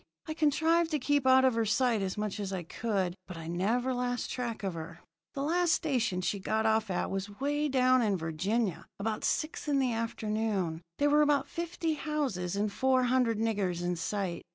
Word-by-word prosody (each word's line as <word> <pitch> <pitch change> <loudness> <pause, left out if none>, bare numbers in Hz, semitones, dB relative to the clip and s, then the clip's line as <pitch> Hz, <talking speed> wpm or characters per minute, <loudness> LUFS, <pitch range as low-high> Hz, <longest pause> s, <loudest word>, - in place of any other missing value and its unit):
I 310 - -4
contrived 320 +2 +2
to 310 - +1
keep 285 0 +1
out 260 0 +6
of 260 - +4
her 230 0 +1
sight 225 +1 +2
as 190 0 -3
much 210 0 -3
as 200 -2 -3
I 185 -2 -3
could, 190 -1 -2
but 180 - -8
I 165 - -7
never 220 +10 0
lost 245 0 -2
track 235 -4 -4
of 190 -2 -1
her. 165 +1 -7 0.4
"The 275 - -2
last 345 +3 +2
station 240 - 0
she 200 +2 -1
got 220 +3 0
off 220 -1 +2
at 180 - -1
was 195 +1 -2
away 290 +8 -1
down 255 -1 +4
in 205 -4 +1
Virginia, 185 +6 -1
about 215 +1 -2
six 310 0 -1
in 290 -1 +2
the 260 -3 +1
afternoon. 215 -6 -2 0.2
There 290 0 +2
were 300 +1 +5
about 290 -2 +3
fifty 335 -1 -2
houses 275 - -2
and 205 0 -1
four 260 +1 +2
hundred 245 -3 +2
niggers 200 -6 -1
in 175 0 0
sight. 185 0 -3
225 Hz, 200 wpm, -30 LUFS, 195-275 Hz, 0.4 s, out